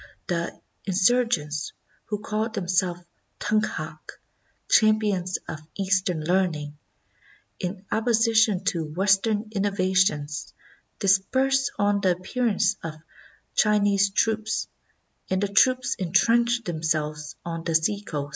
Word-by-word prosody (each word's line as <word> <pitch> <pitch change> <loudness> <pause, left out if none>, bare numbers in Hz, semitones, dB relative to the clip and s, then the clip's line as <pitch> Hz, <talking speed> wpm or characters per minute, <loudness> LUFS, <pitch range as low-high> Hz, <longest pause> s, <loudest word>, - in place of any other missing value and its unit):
The 170 -1 -3 0.3
insur 230 +6 +3
gents, 150 -4 -2 0.3
who 210 0 -4
called 220 +1 -2
themselves 180 -2 0 0.4
Tunkhak 165 -7 -1 0.7
("champions 210 -4 +3
of 155 - -5 0.2
Eastern 190 -4 0
learning"), 155 -4 -1 0.8
in 185 +2 -5
opposition 225 -3 +3
to 175 -4 0
Western 200 +6 +1
innova 195 -2 -1
tions, 150 -6 0 0.4
dispersed 260 +8 +2
on 205 0 +2
the 185 -2 +3
appearance 205 +4 0
of 160 -1 -6 0.6
Chinese 205 -2 +3
troops, 220 +2 0 0.6
and 190 - +1
the - - +2
troops 255 +5 +3
intrenched 235 +6 +2
themselves 155 -2 -2
on 165 -1 -4
the 165 -1 -1
seacoast. 160 -4 -1
195 Hz, 105 wpm, -25 LUFS, 170-215 Hz, 0.8 s, insur